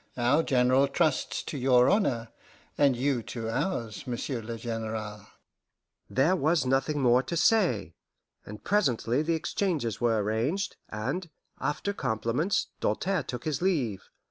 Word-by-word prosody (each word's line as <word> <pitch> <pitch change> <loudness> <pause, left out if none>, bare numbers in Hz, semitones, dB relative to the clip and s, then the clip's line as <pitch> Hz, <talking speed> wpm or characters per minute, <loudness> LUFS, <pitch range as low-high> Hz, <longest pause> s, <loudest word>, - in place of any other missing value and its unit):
Our 125 +6 +3
General 130 -1 +3
trusts 155 0 0
to 145 - -5
your 125 -1 +5
honour, 130 - +1 0.5
and 140 -3 +3
you 130 -1 +1
to 115 0 -5
ours, 125 - -3
Monsieur 120 0 -3
le 115 +1 -6
General." 110 -2 -5 0.8
There 150 +8 +3
was 155 -3 +2
nothing 135 +3 +1
more 125 0 +5
to 170 +6 -4
say, 165 - +2 0.5
and 105 +1 -10
presently 135 - +1
the 165 +1 0
exchanges 155 - -2
were 115 -2 +2
arranged, 120 - -1
and, 135 +12 -3 0.3
after 200 +7 -2
compliments, 125 - -1
Doltaire 190 0 0
took 125 -1 -6
his 150 -2 -1
leave. 135 - -1
130 Hz, 135 wpm, -28 LUFS, 115-160 Hz, 0.8 s, your